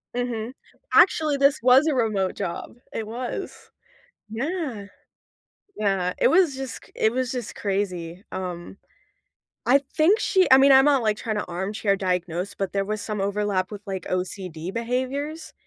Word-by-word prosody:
Mhm. 245 Hz, -1 st, -3 dB, 0.4 s
Actually, 310 Hz, -5 st, +4 dB
this 280 Hz, 0 st, +3 dB
was 260 Hz, +5 st, +6 dB
a 295 Hz, -, +2 dB
remote 210 Hz, -6 st, 0 dB
job. 185 Hz, 0 st, -5 dB, 0.2 s
It 220 Hz, -1 st, -4 dB
was. 240 Hz, +2 st, -6 dB, 0.6 s
Yeah. 260 Hz, -, -3 dB, 0.9 s
Yeah. 195 Hz, -3 st, 0 dB
It -, -, +4 dB
was 335 Hz, -5 st, +4 dB
just 265 Hz, -2 st, -6 dB
cr -, -, -18 dB
it 220 Hz, -, +2 dB
was 255 Hz, 0 st, -1 dB
just 245 Hz, -4 st, -5 dB
crazy. 185 Hz, -3 st, -3 dB
Um, 180 Hz, 0 st, -6 dB, 0.9 s
I 275 Hz, +3 st, +5 dB, 0.2 s
think 365 Hz, +8 st, +4 dB
she 375 Hz, -2 st, +3 dB
I 260 Hz, -, +10 dB
mean, 275 Hz, +1 st, +6 dB
I'm 265 Hz, +1 st, +7 dB
not, 280 Hz, -4 st, +3 dB
like, 215 Hz, -1 st, +1 dB
trying 220 Hz, -3 st, -3 dB
to -, -, -2 dB
armchair 195 Hz, +3 st, -1 dB
diagnose, 180 Hz, 0 st, -2 dB
but 195 Hz, -1 st, -3 dB
there 195 Hz, 0 st, +1 dB
was 215 Hz, 0 st, -3 dB
some 210 Hz, -2 st, -3 dB
overlap 200 Hz, -1 st, -1 dB
with, 205 Hz, -1 st, -7 dB
like, 190 Hz, -3 st, -5 dB
OCD 180 Hz, -2 st, -4 dB
behaviors. 260 Hz, +7 st, -3 dB
215 Hz, 155 wpm, -24 LUFS, 190-265 Hz, 0.9 s, I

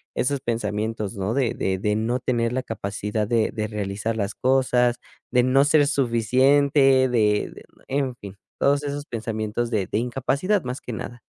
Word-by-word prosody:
esos 140 Hz, +1 st, 0 dB
pensamientos, 110 Hz, -1 st, -2 dB
¿no?, 100 Hz, +3 st, -2 dB
de 130 Hz, -4 st, +1 dB
de 95 Hz, 0 st, -1 dB
de 105 Hz, +2 st, 0 dB
no 120 Hz, +4 st, 0 dB
tener 115 Hz, -2 st, 0 dB
la 130 Hz, +1 st, -2 dB
capacidad 105 Hz, -1 st, -3 dB
de 115 Hz, -1 st, +1 dB
de 110 Hz, -1 st, -3 dB
realizar 105 Hz, +1 st, -3 dB
las 100 Hz, -1 st, -2 dB
cosas, 125 Hz, -2 st, +2 dB, 0.3 s
de 125 Hz, -1 st, +4 dB
no 130 Hz, +2 st, +4 dB
ser 145 Hz, 0 st, +4 dB
suficiente, 135 Hz, +2 st, +3 dB
de 105 Hz, -4 st, 0 dB, 0.2 s
e 135 Hz, -, -1 dB
en 130 Hz, -3 st, -1 dB
fin, 100 Hz, -4 st, -10 dB, 0.2 s
todos 140 Hz, +1 st, +2 dB
esos 145 Hz, 0 st, -4 dB
pensamientos 115 Hz, 0 st, -3 dB
de 105 Hz, -5 st, 0 dB
de 105 Hz, -, -2 dB
incapacidad, 135 Hz, -, 0 dB
más 125 Hz, +1 st, -5 dB
que 125 Hz, -, -7 dB
nada. 120 Hz, +2 st, -7 dB
120 Hz, 170 wpm, -23 LUFS, 110-130 Hz, 0.3 s, de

